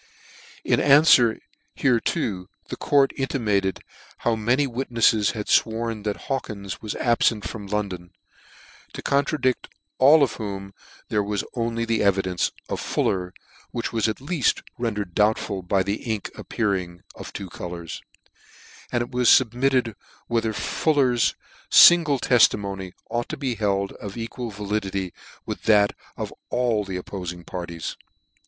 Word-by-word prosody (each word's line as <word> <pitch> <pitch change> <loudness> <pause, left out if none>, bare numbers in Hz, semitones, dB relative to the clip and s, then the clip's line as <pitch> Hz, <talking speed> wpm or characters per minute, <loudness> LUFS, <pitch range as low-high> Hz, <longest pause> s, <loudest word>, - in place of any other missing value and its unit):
In - - +2
anfwer 140 -5 +6 0.4
hereto 115 - 0 0.2
the - - -4
court 140 -2 +3
intimated 105 -8 0 0.4
how 115 - 0
many 120 +6 +1
witnefTes 115 -4 +2
had 105 -3 -4
fworn 115 -1 +1
that 105 -1 -2
Hawkins 100 -8 -4
vvas 110 - -6
abfent 115 -3 +2
from 105 -3 -6
London; 95 -4 -3 0.8
to - - -7
contradict 140 -2 +1 0.3
all 145 +3 +7
whom 100 -5 -6 0.4
there 105 - +1
was 105 0 -2
only 115 -1 -1
the 115 -1 0
evidence 95 -2 +1 0.2
of - - -3
Fuller, 90 -2 -1 0.4
which 120 - -4
was 115 -1 +1
at 110 - -1
leaft 145 0 0 0.2
render 110 -4 -1
ed 90 -3 -18
doubtful 105 -1 +1
by 95 +1 +1
the 100 +2 -1
ink 110 -4 -3
appearing 95 -6 -2
of - - -9
two 100 - -6
colours: 85 -2 -7 0.9
and 120 -1 +1
it 120 - -9
was 125 -1 +3
fubmitted 125 -1 +3 0.3
whether 115 -2 0
Fuller's 130 0 +1 0.3
fingle 165 -5 +7
tefli 125 -5 +5
mony 95 -2 -6 0.2
ought 120 0 -2
to 155 - -4
be 135 -3 -2
held 100 -3 0
of 100 0 -7
equal 115 +1 -5
validity 100 -3 -3 0.3
with - - -5
that 105 -2 +4 0.2
of - - -5 0.2
all 120 -4 +1
the 95 -2 -5
oppofing 90 -2 -6
parties. 85 -2 -5
110 Hz, 135 wpm, -24 LUFS, 100-125 Hz, 0.9 s, all